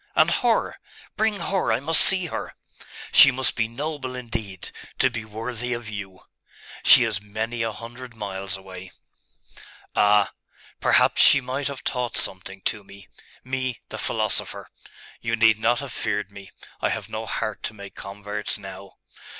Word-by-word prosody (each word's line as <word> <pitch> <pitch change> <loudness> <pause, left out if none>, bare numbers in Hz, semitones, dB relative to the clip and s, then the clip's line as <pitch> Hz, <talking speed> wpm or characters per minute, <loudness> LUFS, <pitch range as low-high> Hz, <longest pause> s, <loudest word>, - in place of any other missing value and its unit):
And - - +5
her.... - - +1 0.4
Bring 220 -1 +2
her.... 190 +3 0
I - - +2
must 160 +4 +4
see 190 -2 +4
her! 165 - -5 0.6
She 140 - +10
must 130 0 +1
be 115 -2 +1
noble, 130 +1 -4
indeed, 115 -6 -6 0.3
to 130 - +3
be 115 -2 -4
worthy 115 +3 -4
of 120 -1 -5
you.' 95 -3 -7 0.6
'She - - +9
is 110 -3 -1
many 110 +3 -4
a 115 -1 0
hundred 120 +2 -10
miles 95 -3 -4
away.' 95 -1 -10 1.1
'Ah! 105 0 +4 0.5
Perhaps - - +4
she 140 - +8
might 130 +2 -3
have 140 -2 -6
taught 125 -2 -2
something 95 0 -1
to 105 +1 -1
me 100 0 -15 0.3
me, 130 -2 -3
the - - -6
philosopher! - - -1 0.5
You 115 0 0
need 110 -1 +4
not 120 +3 +2
have 140 -3 -7
feared 105 -2 -2
me.... 100 -1 -11 0.3
I - - +2
have - - -3
no - - -5
heart - - -3
to 110 - -5
make 100 -1 -10
converts 105 +1 -4
now.... 95 -1 -10
115 Hz, 160 wpm, -24 LUFS, 100-125 Hz, 1.1 s, She